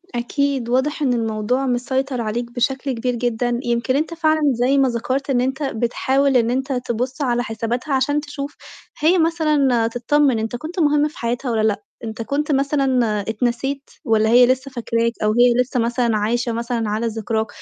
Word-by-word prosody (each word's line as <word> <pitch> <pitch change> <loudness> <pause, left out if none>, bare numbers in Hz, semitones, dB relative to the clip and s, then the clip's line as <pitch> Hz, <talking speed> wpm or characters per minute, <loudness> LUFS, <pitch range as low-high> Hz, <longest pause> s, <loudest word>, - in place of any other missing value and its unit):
أكيد، 260 +1 -1
واضح 260 +5 0
إن 265 -4 +2
الموضوع 225 +3 -1
مسيطر 260 +1 -1
عليك 235 +2 -3
بشكل 265 +3 -1
كبير 245 0 -2
جدًا، 240 0 -1
يمكن 240 +2 0
أنت 315 +4 -1
فعلًا 315 -2 +1
زي 250 +4 +2
ما 270 -1 +4
ذكرت 255 +4 -2
إن 250 -2 +2
أنت 265 +3 -2
بتحاول 265 +2 +1
إن 235 -1 +2
أنت 265 +2 -1
تبُصّ 250 +2 -3
على 245 -3 +1
حساباتها، 240 +4 -3
عشان 280 +3 +1
تشوف 290 -1 -6 0.4
هي 330 +5 +4
مثلًا 300 -8 +2
تطمّن 245 +2 +1
أنت 220 +2 -3
كُنت 320 +9 -6
مُهم 295 -1 +3
في 305 - -12
حياتها 240 +2 -2
والّا 220 -1 +1
لأ، 210 -1 0 0.2
أنت 220 0 -5
كُنت 290 +5 -1
مثلًا 270 -3 +2 0.2
اتنسيت 250 +5 -2 0.2
والّا 220 -1 +3
هي 245 +2 +7
لِسّه 260 +2 0
فاكراك 230 -2 0
أو 215 - +3
هي 240 +2 +5
لِسّه 250 0 -2
مثلًا 235 -1 +1
عايشة 235 +3 0
مثلًا 230 -1 -2
على 220 +3 -1
ذِكراك، 220 0 -2
250 Hz, 175 wpm, -20 LUFS, 235-275 Hz, 0.4 s, هي